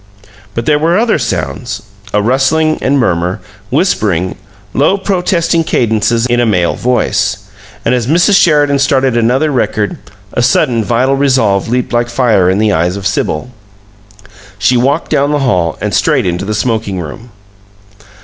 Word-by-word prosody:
But 115 - -2
there 150 -1 +2
were 165 +4 +2
other 220 -5 +1
sounds: 120 -3 -3 0.3
a 105 0 +1
rustling 135 +6 +1
and 140 +2 +1
murmur, 90 -7 0 0.3
whispering, 90 -3 0 0.4
low 150 +8 +2
protesting 175 -4 0
cadences 115 -3 0
in 120 -1 +1
a 120 - +2
male 90 -5 +1
voice. 125 0 0 0.5
And - - +2
as 120 -2 -1
Mrs. 175 +7 +3
Sheridan 145 -6 +3
started 135 -2 +1
another 125 +6 +1
record, 110 -5 -1 0.3
a - - 0
sudden, 120 -2 +2
vital 125 +5 +1
resolve 130 -8 +1
leaped 125 0 -1
like 120 0 0
fire 120 -7 +2
in 95 - +1
the 105 0 +2
eyes 90 +1 0
of 100 -1 -7
Sibyl. 90 +2 -2 1.1
She 105 +5 +2
walked 140 +6 0
down 140 +1 +1
the - - +2
hall 90 -9 0
and - - -2
straight - - +1
into 90 +1 -2
the 105 +1 -2
smoking 110 -4 -2
room. 90 +9 -8
120 Hz, 155 wpm, -12 LUFS, 105-140 Hz, 1.1 s, Mrs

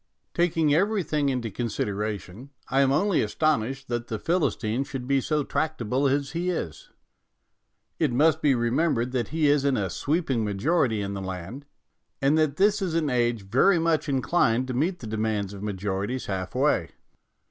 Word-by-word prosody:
Taking 165 -3 +2
everything 165 -5 +1
into 125 -4 -2
consideration, 105 +1 -4 0.2
I 135 +1 +3
am 135 -1 +3
only 190 +7 +2
astonished 135 -3 0
that 120 0 -2
the 110 - -3
Philistine 125 - 0
should 135 -2 -6
be 135 -1 +2
so 150 +2 0
tractable 140 -4 -1
as 140 +1 0
he 170 +3 -2
is. 80 - -4 1.1
It 155 -5 +2
must 155 +5 +3
be 145 -2 +4
remem 125 +8 +1
bered 120 +2 -1
that 125 -4 -1
he 160 0 0
is 145 -1 +3
in 140 -2 +2
a 95 -3 -1
sweeping 140 - 0
majority 110 - +1
in 100 0 -4
the 100 - -5
land, 95 +9 -7 0.5
and 140 +2 +3
that 155 -3 +2
this 205 +4 +3
is 180 -4 -1
an 155 -4 +1
age 120 -3 +1
very 130 - +3
much 165 -2 +1
inclined 130 -3 +1
to - - -2
meet 170 +8 -1
the - - -7
demands 110 -2 -2
of 100 - -9
majorities 100 +4 -3
half 95 -2 -4
way. - - +2
135 Hz, 170 wpm, -26 LUFS, 110-155 Hz, 1.1 s, be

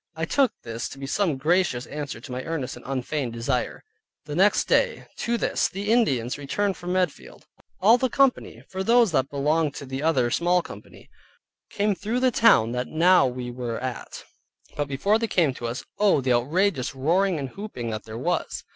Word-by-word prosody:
I 160 0 -2
took 270 - +2
this 115 0 -5
to - - -10
be 135 - -6
some 160 0 0
gracious 155 -3 +1
answer 145 -4 -6
to 125 - -10
my 125 +1 -3
earnest 160 -6 -4
and 120 - -13
unfeigned 135 -1 -2
desire. 120 +2 -2 0.4
The 150 - -6
next 200 +4 +4
day, - - +2
viz. - - -15
to 235 0 -1
this, - - +1
the 200 +3 -3
Indians 135 - +1
returned 195 +8 -1
from 180 0 -4
Medfield, 185 -4 -2 0.3
all 225 +6 +5
the 260 - +1
company, 270 +1 +1
for 190 0 -5
those 235 -1 +4
that 135 -3 +1
belonged 150 +1 0
to - - -7
the 130 +1 -5
other 135 -7 +2
small 175 +3 +2
company, - - -12 0.6
came 205 0 0
through 220 +6 -2
the 255 -1 +3
town 210 - +4
that 125 +1 -2
now 175 0 +4
we 125 -1 -5
were 120 -2 -4
at. 125 -1 -6 0.5
But 145 -1 -2
before 195 +11 +1
they 230 - -1
came 165 -10 +2
to 120 -1 -5
us, 120 +2 -5
Oh! 205 -7 +4
the 130 -1 +1
outrageous 145 +3 0
roaring 175 +7 +1
and 135 -3 -4
hooping 130 - -6
that 110 0 -5
there 110 0 -7
was. - - -2
150 Hz, 195 wpm, -25 LUFS, 125-195 Hz, 0.6 s, all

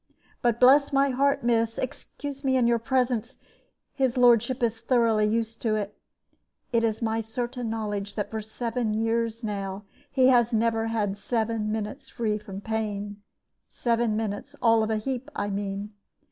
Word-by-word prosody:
But 240 -1 +1
bless 280 +3 +6
my 275 0 +3
heart, 280 +1 +2
miss 230 -1 +1
excuse 275 +2 -6
me 260 -1 +2
in 250 - +3
your 235 0 +3
presence 245 -1 0 0.6
his 260 -3 0
lordship 245 +1 +4
is 225 -1 0
thoroughly 230 -3 +3
used 225 +1 -1
to 220 -2 +1
it. 210 -1 -3 0.8
It 230 0 +3
is 225 0 0
my 225 0 0
certain 240 +1 -4
knowledge 205 -2 -3
that 205 - -3
for 220 -1 -3
seven 230 +1 -2
years 230 +1 0
now 200 -2 -4 0.3
he 260 -1 +5
has 240 -2 +4
never 225 0 +1
had 205 -3 -1
seven 225 -2 -1
minutes 220 +5 -4
free 215 -2 -1
from 200 -2 -8
pain 205 -2 -3 0.5
seven 235 -2 0
minutes 220 +6 -4
all 230 -2 +4
of 220 - 0
a 220 - +1
heap, 260 +4 -4
I 205 - -2
mean. 200 +1 -4
225 Hz, 160 wpm, -26 LUFS, 215-245 Hz, 0.8 s, bless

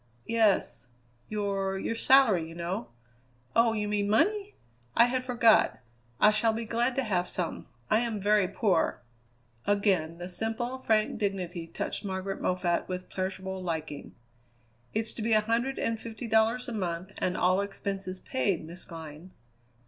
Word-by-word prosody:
"Yes. 210 - +2 0.4
Your 195 -2 -1
your 195 - -2
salary, 225 -9 +4
you 165 - -10
know." 170 -6 -3 0.7
"Oh, 230 -1 +5
you 210 -1 -1
mean 205 -1 0
money? 410 - +2 0.4
I 235 - +8
had 255 +1 -1
forgot. 235 -3 +4 0.4
I 210 - +7
shall 220 +1 +2
be 230 +1 -3
glad 240 +3 0
to 270 - +1
have 185 -6 0
some. 180 -3 -4 0.2
I 215 - +3
am 230 -3 -2
very 205 -1 +3
poor." 185 - +1 0.6
Again 190 -6 +2
the 175 +1 -6
simple, 225 +7 -2
frank 220 -4 +1
dignity 185 -5 -2
touched 165 - -4
Margaret 190 0 -3
Moffatt 180 -1 0
with 185 0 -5
pleasurable 190 0 -4
liking. 160 -4 -5 0.8
"It's 220 +1 -1
to - - -6
be 225 +1 +1
a 215 - +5
hundred 235 +5 0
and 225 -1 -1
fifty 225 +1 -7
dollars 225 +3 +2
a 240 - -4
month 185 -2 -3
and 185 - 0
all 185 +2 +3
expenses 195 -2 -4
paid, 200 -11 -1
Miss 170 +3 -10
Glynn." 160 0 -9
205 Hz, 155 wpm, -29 LUFS, 185-225 Hz, 0.8 s, I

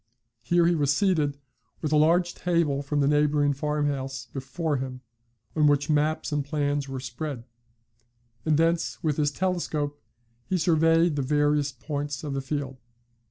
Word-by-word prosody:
Here 170 +8 +3
he 175 - +4
was 145 -4 +2
seated, 150 -3 +1 0.5
with 155 - -1
a - - +3
large 170 +3 +3
table 170 -6 0
from 145 +1 -1
the 140 - +3
neighbouring 145 0 +3
farm 150 +1 -1
house 135 -2 -3
before 145 +3 -2
him, 130 -1 -5 0.5
on 150 -2 +4
which 145 +1 +2
maps 155 +2 +1
and 145 -1 0
plans 145 -1 -1
were 135 -1 -4
spread; 130 0 -5 1.0
and 155 -2 +2
thence 165 +1 0
with 150 -3 0
his 150 -2 +2
telescope 150 -4 -2 0.5
he 185 - +2
surveyed 165 -1 +3
the - - +1
various 145 +1 +1
points 145 +2 -4
of 145 -2 -3
the 135 - -2
field. 135 -1 -4
145 Hz, 160 wpm, -26 LUFS, 140-160 Hz, 1.0 s, he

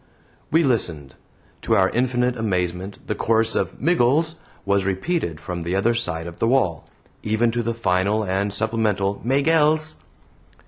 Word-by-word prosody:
We 165 +2 +3
listened. 85 - 0 0.5
To 115 - +1
our 95 -2 +3
infinite 125 0 0
amazement 95 -3 -2
the - - -2
chorus 115 +1 +1
of - - -2
"Miggles" 160 0 +2 0.3
was 100 -1 +2
repeated 95 - -2
from 90 +3 -5
the 85 +2 -2
other 110 +5 +2
side 90 -8 -1
of 85 -1 -9
the 115 - +1
wall, 115 - +1 0.3
even 110 +2 +1
to 120 +1 -1
the 115 0 -2
final 100 0 +1
and 100 +1 -1
supplemental 105 -3 -1
"Maygells." 155 +4 +2
110 Hz, 145 wpm, -22 LUFS, 95-125 Hz, 0.5 s, We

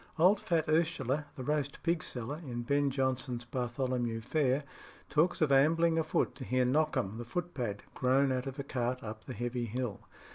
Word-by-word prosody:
Old 185 +5 +5
fat 165 -5 +1
Ursula, 155 -3 +1
the 130 - -6
roast 145 0 -1
pig 170 -1 +1
seller 125 +5 -4
in 120 -4 -4
Ben 140 +3 +2
Jonson's 130 -2 -1
Bartholomew 120 -1 -1
Fair 135 +2 +1 0.5
talks 160 +4 +2
of 155 -3 +3
ambling 165 +4 +4
afoot 160 - +1
to 135 - -6
hear 130 0 +2
Knockhem 130 -6 +1
the - - -3
footpad 120 - -3
groan 130 +2 +3
out 130 +1 -1
of 135 +1 -5
a 140 - -3
cart 125 -2 -2
up 110 0 -7
the 130 - -6
Heavy 120 0 -2
Hill. 120 -1 -3
130 Hz, 175 wpm, -32 LUFS, 125-155 Hz, 0.5 s, Old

